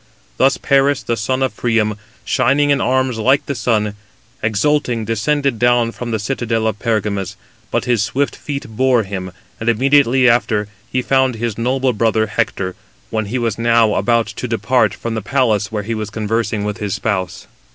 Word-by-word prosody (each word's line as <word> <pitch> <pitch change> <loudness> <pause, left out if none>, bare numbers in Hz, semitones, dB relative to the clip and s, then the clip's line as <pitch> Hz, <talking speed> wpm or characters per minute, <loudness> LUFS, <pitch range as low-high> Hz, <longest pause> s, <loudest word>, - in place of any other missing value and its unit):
Thus 135 - +3
Paris, 140 0 +2
the 115 - -1
son 130 +5 -1
of 130 - -1
Priam, 110 -3 +1 0.3
shining 140 +3 +2
in 140 - +2
arms 130 -2 +1
like 130 +5 +3
the 140 - -2
sun, 105 -3 0 0.5
exulting 115 +2 0
descended 125 +3 0
down 120 -1 +3
from 120 0 -6
the 110 - 0
citadel 115 0 -1
of 110 -1 -1
Pergamus, 105 -4 -1 0.3
but - - -1
his 120 -3 +2
swift 140 +6 -1
feet 140 -2 -5
bore 125 +1 +2
him, 95 -2 -5 0.3
and 115 - 0
immediately 130 +1 +4
after 115 -3 +2 0.2
he 130 - 0
found 130 -2 +2
his 115 -1 -3
noble 130 +2 0
brother 110 0 +1
Hector, 100 -3 -2 0.4
when 110 -1 -1
he 120 +5 -2
was 115 -3 -1
now 115 -2 +3
about 115 +3 +2
to 115 +3 -6
depart 110 -1 +1
from 115 0 -4
the 110 - -2
place 110 -4 +1
where 105 -2 -2
he 115 +3 -3
was 110 -1 -4
conversing 110 0 -1
with 105 0 -3
his 105 -2 -2
spouse. 95 -5 -2
115 Hz, 175 wpm, -18 LUFS, 110-130 Hz, 0.5 s, immediately